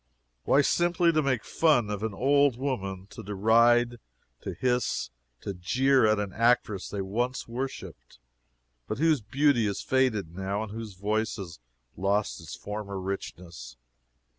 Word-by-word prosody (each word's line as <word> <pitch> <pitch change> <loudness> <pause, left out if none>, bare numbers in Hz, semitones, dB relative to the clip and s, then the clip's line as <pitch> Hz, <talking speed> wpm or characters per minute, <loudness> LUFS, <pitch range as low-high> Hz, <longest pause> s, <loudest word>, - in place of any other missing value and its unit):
Why, 140 - +5
simply, 175 +1 +2
to 155 -1 +2
make 130 -5 0
fun 125 -10 +2
of 105 -1 -3
an 110 -2 -3
old 140 +1 +3
woman 95 -9 -3
to 110 +2 -9
deride, 115 +4 +3 0.4
to - - -6
hiss, 125 - -1 0.3
to 100 - -4
jeer 125 +8 +2
at 110 0 +3
an 100 -2 -3
actress 115 -4 +1
they 100 -1 -3
once 120 +7 -2
worshipped, 120 - -6 0.7
but - - -3
whose 155 -2 +3
beauty 130 +1 +2
is 100 - -3
faded 115 -10 +1
now 95 +3 -2
and 110 - -7
whose 110 -2 -7
voice 105 +4 -1
has 90 - -8 0.4
lost 100 0 0
its 80 - -8
former 105 -1 -6
richness. 90 -8 -7
110 Hz, 145 wpm, -28 LUFS, 100-130 Hz, 0.7 s, Why